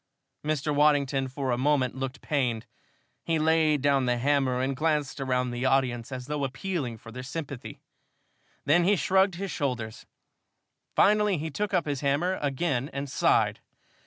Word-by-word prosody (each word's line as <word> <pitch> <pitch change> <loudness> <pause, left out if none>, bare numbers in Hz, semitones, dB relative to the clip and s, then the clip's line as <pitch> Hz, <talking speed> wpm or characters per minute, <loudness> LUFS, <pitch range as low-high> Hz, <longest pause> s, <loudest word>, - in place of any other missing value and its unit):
Mr. 150 -1 -1
Waddington 145 -2 +2
for 135 0 -3
a 120 - 0
moment 135 -2 +2
looked 135 0 -5
pained. 125 -7 -1 0.6
He 165 -1 0
laid 155 -2 +2
down 140 -3 +3
the 120 0 +2
hammer 135 -1 +1
and 135 +1 -1
glanced 150 -1 -1
around 125 -1 0
through 120 - -4
the 130 - -1
audience, 130 -2 +1
as 125 -1 -5
though 150 0 -3
appealing 135 -2 -3
for 115 +1 -12
their 125 +2 -7
sympathy. 140 -1 -7 0.8
Then 160 +5 +4
he 200 +4 +4
shrugged 190 0 +2
his 195 +1 -4
shoulders. 120 -7 -3 0.9
Finally, 210 -2 +4
he 160 +2 -4
took 210 +7 -2
up 180 -3 +1
his 145 -3 -2
hammer 150 +7 +1
again 140 -1 -1
and 140 0 -5
sighed. - - +2
140 Hz, 160 wpm, -27 LUFS, 130-155 Hz, 0.9 s, Then